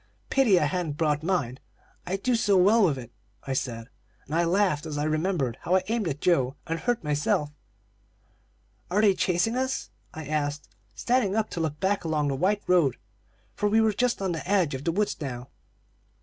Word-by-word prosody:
"'Pity 235 -9 +4
I 150 - +2
hadn't 155 -1 -2
brought 150 -2 +1
mine 155 -8 -1 0.5
I 185 - -1
do 245 +6 0
so 205 -4 +3
well 205 +5 +5
with 155 -7 +2
it,' 120 -2 -9 0.3
I 135 - -3
said, 115 -3 -3 0.4
and 145 - -8
I 170 +1 +2
laughed 170 -4 +1
as 150 -2 -4
I 145 - -1
remembered 155 -5 -1
how 180 - +1
I 185 - +2
aimed 225 -4 0
at 145 -2 -4
Joe 135 -7 +2
and 165 -1 -3
hurt 240 +2 -1
myself. 150 0 0 1.4
"'Are 200 +4 +2
they 205 -2 +5
chasing 185 +5 0
us?' 260 +1 -2 0.2
I 160 -1 -8
asked, 145 0 -2 0.3
standing 240 - +1
up 220 -1 0
to - - -4
look 155 -2 -2
back 195 0 0
along 155 -3 0
the 135 - -1
white 200 +8 0
road, 170 -9 +3 0.6
for 210 - 0
we 220 +2 +3
were 220 -1 +3
just 240 -1 0
on 190 - 0
the 165 +2 -5
edge 185 -8 +2
of 130 +2 -5
the 165 - +2
woods 205 +4 0
now. 125 -3 -5
170 Hz, 195 wpm, -26 LUFS, 145-200 Hz, 1.4 s, well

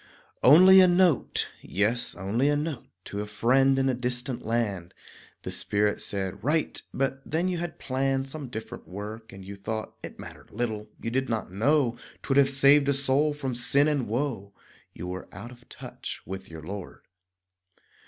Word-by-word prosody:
Only 185 +7 +8
a 185 - +7
note, 175 -5 +3
yes, 110 +5 0
only 110 +9 0
a 145 - +2
note 150 -2 -3 0.2
To 100 - -4
a 105 - -5
friend 135 +6 +3
in 135 0 +2
a 130 - +2
distant 125 0 -1
land. 105 -7 -2 0.5
The - - -4
Spirit 105 0 0
said 95 -2 -4
"Write," 150 +4 0
but 135 0 -2
then 165 +4 -1
you 180 -2 -1
had 175 -1 -5
planned 135 0 -1
Some 140 0 -7
different 110 -2 -8
work, 105 +4 -8
and 95 -1 -11
you 100 +1 -8
thought 110 +2 -5
It - - -9
mattered - - -11
little. 110 -2 -3
You 115 - -4
did 130 +2 -1
not 110 -6 -2
know 120 +4 +2 0.3
'Twould 135 - 0
have 140 -1 +6
saved 140 +1 +5
a - - +4
soul 140 +2 +1
from 135 -3 -3
sin 140 +4 +3
and 145 -5 0
woe; 110 -4 -3 0.4
You 90 - -8
were 90 +1 -6
"out 110 +6 -9
of 120 -1 -17
touch" - - -8
with 95 0 -7
your 80 -1 -9
Lord. 95 +2 -8
125 Hz, 175 wpm, -27 LUFS, 105-140 Hz, 0.5 s, Only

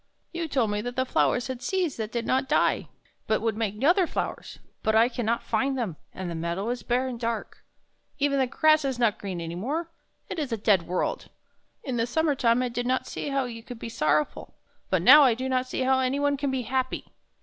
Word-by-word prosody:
You 335 -1 -3
told 250 -8 +1
me 205 0 -1
that 245 +2 -5
the 260 0 +1
flowers 245 -1 +1
had 260 -2 -5
seeds 365 -4 -1
that 220 -1 -4
did 235 -1 -2
not 265 +1 0
die, - - +2 0.4
but 220 - +2
would 225 -2 -1
make 215 +1 -3
other 350 +4 +4
flowers; - - -4 0.2
but 220 - +1
I 225 +2 +6
can 245 -2 -4
not 235 +1 0
find 270 0 0
them, 215 -10 -2 0.2
and 185 - -6
the 170 - -4
meadow 170 +6 -3
is 245 -1 -2
bare 245 +5 0
and 245 -2 -5
dark. 230 -1 -4 0.5
Even 280 -1 +1
the 260 - +2
grass 310 +3 +4
is 265 -3 -1
not 235 -4 +1
green 190 -3 -5
any 165 0 -5
more. 295 - -3 0.4
It - - -5
is 285 -5 -3
a 230 - 0
dead 200 -5 +2
world. 180 +1 -2 0.5
In 255 -4 -3
the 230 0 +1
summer 315 +4 +1
time 245 -2 +2
I 250 - -1
did 245 +1 -3
not 255 +1 0
see - - -5
how 275 -1 0
you 230 -2 -7
could 240 +1 -9
be 230 - -6
sorrow 150 -7 +2
ful; - - -13 0.3
but 185 -3 +1
now 290 +8 +10
I 255 -5 +5
do 260 +3 -3
not 255 -1 0
see 255 - -3
how 260 0 +3
any 260 +2 0
one 285 0 +2
can 280 0 -2
be 265 -1 -1
happy." 260 +1 -2
245 Hz, 240 wpm, -26 LUFS, 220-270 Hz, 0.5 s, now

